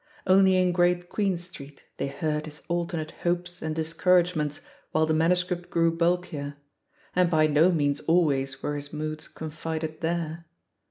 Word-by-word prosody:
Only 190 0 +5
in 180 -1 +3
Great 175 0 +2
Queen 195 -4 0
Street 155 -5 -11
they - - -1
heard 150 +2 -2
his 150 0 -11
alternate 170 -2 -2
hopes 175 0 -1
and 160 -1 -3
discouragements 165 -1 +1 0.3
while 160 0 +3
the 160 - +1
manuscript 175 +2 +1
grew 165 0 +2
bulkier, 170 -4 -1 0.6
and 180 -1 +4
by 155 -2 +4
no 155 +4 +4
means 145 -3 +1
always 140 -6 +1
were 145 - -1
his 145 0 -6
moods 155 0 -4
confided 160 0 -5
there. 165 0 -2
165 Hz, 150 wpm, -27 LUFS, 155-175 Hz, 0.6 s, Only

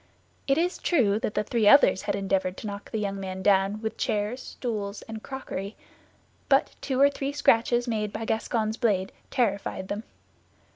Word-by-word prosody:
It 275 0 +3
is 350 +2 0
true 220 - +2
that 210 - -3
the - - +1
three 225 -1 +1
others 275 -6 +6
had - - -1
endeavored 190 -2 -1
to - - -8
knock 205 0 -6
the 220 - -3
young 200 -2 -2
man 190 -1 -5
down 200 +2 +2
with 220 - -3
chairs, 210 +5 -1
stools, 210 -6 -4
and 220 -1 -8
crockery; 220 -7 -6 0.7
but 275 -1 +3
two 265 -2 -1
or 280 +1 +6
three 275 0 -3
scratches 240 -3 +3
made 215 -3 -1
by - - -5
the - - -3
Gascon's 220 0 -1
blade 200 -6 +1 0.2
terrified 200 -6 -1
them. 205 +1 -3
215 Hz, 180 wpm, -27 LUFS, 200-245 Hz, 0.7 s, others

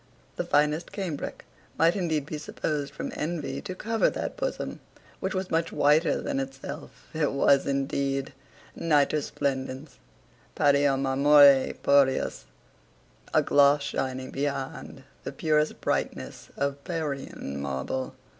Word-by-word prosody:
The - - -2
finest 150 +3 +1
cambric 180 -8 -5 0.3
might 165 +3 +4
indeed 160 -7 -1
be 150 0 -5
supposed 150 -1 -3
from - - -5
envy 160 0 -3
to 185 -2 -6
cover 225 +3 +1
that - - -4
bosom - - -3 0.4
which 190 0 -3
was 185 0 -3
much 165 0 +1
whiter 150 +3 +3
than - - -2
itself. 135 0 -7
It 155 -3 0
was 140 0 +3
indeed, 135 0 -1 0.4
Nitor 150 -1 +2
splendens 135 +1 -3 0.6
Pario 140 -1 +3
marmore 140 0 +6
purius. 140 -2 +3 0.9
A - - +3
gloss 145 0 +4
shining 130 -2 -3
beyond 140 -1 -4 0.2
the - - -4
purest 155 -1 0
brightness - - -3
of 140 0 -2
Parian 140 - -4
marble. 70 - -3
145 Hz, 120 wpm, -27 LUFS, 135-155 Hz, 0.9 s, marmore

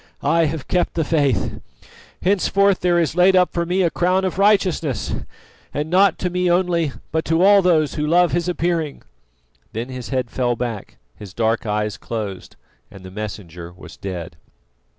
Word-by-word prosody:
I 165 0 +3
have 155 -2 -4
kept 180 -1 0
the 165 - +1
faith! 140 - 0 0.6
Henceforth 200 0 +2
there 175 -1 +2
is 165 -2 0
laid 180 +1 +5
up 180 -1 +3
for 170 -1 -1
me 185 +2 +1
a 170 - +1
crown 185 +2 +1
of 185 0 -3
righteousness... 185 - +1 0.6
and 150 +2 -2
not 190 -1 +4
to 180 - -2
me 180 0 0
only, 175 -3 +1 0.2
but 160 +1 0
to 165 +2 +2
all 200 0 +7
those 160 -5 +2
who 150 0 -2
love 175 +2 +4
His 175 +1 0
appearing." 170 -4 -2 0.7
Then 115 +3 -4
his 125 -3 -7
head 125 -2 -2
fell 120 -2 0
back, 115 -4 -5 0.2
his 100 -3 -11
dark 115 0 0
eyes 105 0 -1
closed, 105 -5 -6 0.3
and 95 - -13
the 95 - -10
Messenger 90 -5 -7
was 90 - -13
dead. 85 -4 -7
160 Hz, 170 wpm, -21 LUFS, 115-180 Hz, 0.7 s, all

